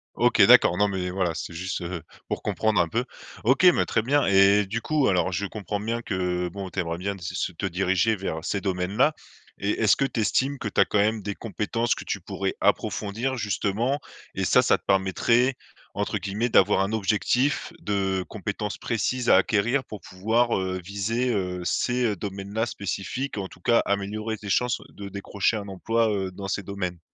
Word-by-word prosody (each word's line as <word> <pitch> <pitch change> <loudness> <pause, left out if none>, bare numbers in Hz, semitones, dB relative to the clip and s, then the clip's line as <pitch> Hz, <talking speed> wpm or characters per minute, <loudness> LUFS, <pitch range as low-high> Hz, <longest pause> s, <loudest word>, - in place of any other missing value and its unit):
OK, - - +3
d'accord. 90 - +7
Non, 105 +1 +3
mais 95 -2 -2
voilà, 90 -2 0
c'était - - -5
juste, 90 +3 -4
heu, 85 -1 -4 0.3
pour - - -3
comprendre 110 -4 +1
un 85 - +1
peu. 120 +6 -1 0.4
OK, 130 - +3
mais 180 -2 +6
très 115 - +1
bien 140 +6 +2
et 95 0 +5 0.2
et 105 - +1
du 115 +5 -3
coup, 150 +2 +1
alors, 95 0 +1
je 100 +3 -1
comprends 105 0 -4
bien 115 +2 -2
que, 90 -4 -1
bon, 95 +1 -6
tu 95 - -5
aimerais 85 -1 -2
bien 100 +3 -3
t 95 - -12
se 85 - -5
se - - -1
te 90 +3 -5
diriger 95 +3 +1
vers 85 -5 -4
ces 100 - -1
domaines-là 100 +9 +1 0.5
et 100 +3 0
est-ce 105 -2 +5
que 135 - +2
tu 120 -4 -2
estimes 130 +8 +1
que 120 - -4
tu - - -2
as - - +5
quand - - -1
même 110 +2 +2
des 100 0 -4
compétences 115 +2 -1
que - - -7
tu - - -3
pourrais - - -3
approfondir, 115 +6 0
justement 110 +5 -1 0.4
et - - -1
ça, - - +5
ça - - +3
te - - -31
permettrait, 115 +7 +2 0.4
entre - - -1
guillemets, 105 +4 -2
«d'avoir 100 -3 +4
un 100 +2 0
objectif 110 +6 +1
de 95 -2 -1
compétences 105 0 -4
précises 120 +2 -1
à - - +8
acquérir» 120 +6 +2
pour 105 - -9
pouvoir, 110 +6 +1
heu, 95 -1 -2
viser, 105 +6 -1
heu, 90 -3 -2
ces, 125 +6 +1
heu, 105 -3 +1
domaines-là 100 +3 -3
spécifiques, 120 +5 -4
ou - - -1
en 95 - -5
tout 90 - -16
cas, 115 +5 +4
améliorer 105 +2 -2
tes 105 -1 -8
chances 125 +4 +1
de 100 -1 -9
décrocher 100 +2 -1
un 100 -1 -6
emploi, 115 +4 0
heu, 95 -2 -2
dans 95 +1 -7
ces 100 +1 -2
domaines? 90 -3 -4
100 Hz, 205 wpm, -25 LUFS, 95-115 Hz, 0.5 s, à